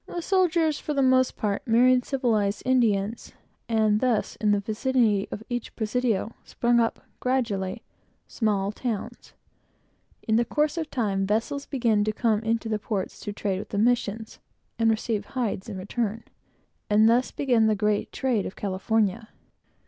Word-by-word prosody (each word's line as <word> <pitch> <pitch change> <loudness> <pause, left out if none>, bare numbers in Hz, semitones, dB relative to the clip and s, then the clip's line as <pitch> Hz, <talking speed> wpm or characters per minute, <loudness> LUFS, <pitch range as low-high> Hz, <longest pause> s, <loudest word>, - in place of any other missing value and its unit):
The 350 - -5
soldiers, 340 -4 +2
for 300 - -4
the 275 - +2
most 260 0 +3
part, 205 -2 -1
married 250 +2 +4
civilized 225 -7 0
Indians; 225 -4 +1 0.4
and 215 -2 +3
thus, 245 -3 0
in 215 - 0
the 205 - +3
vicinity 215 -1 +1
of 210 - -6
each 245 -1 -5
presidio, 225 -1 -1
sprung 240 0 +1
up, 230 -1 0 0.2
gradually, 225 -8 -1 0.4
small 205 -3 0
towns. 220 -1 -5 0.9
In 220 0 +3
the 235 - +3
course 300 +6 0
of 320 -2 -3
time, 195 -5 -1
vessels 235 +7 -1
began 230 -6 +1
to 215 - +1
come 220 -1 +1
into 225 +1 -1
the 215 -1 -1
ports 200 -3 -4
to 205 - -5
trade 200 -2 -2
with - - -8
the 200 - -4
missions, 220 -1 0 0.4
and 225 0 +4
received 220 -1 -1
hides 230 -6 -3
in 200 - -5
return; 220 +3 -3 0.7
and 215 +1 +5
thus 240 +3 +3
began 245 -6 +2
the 215 - +3
great 210 0 0
trade 250 -7 0
of - - -9
California. 210 +2 -1
225 Hz, 155 wpm, -26 LUFS, 210-250 Hz, 0.9 s, and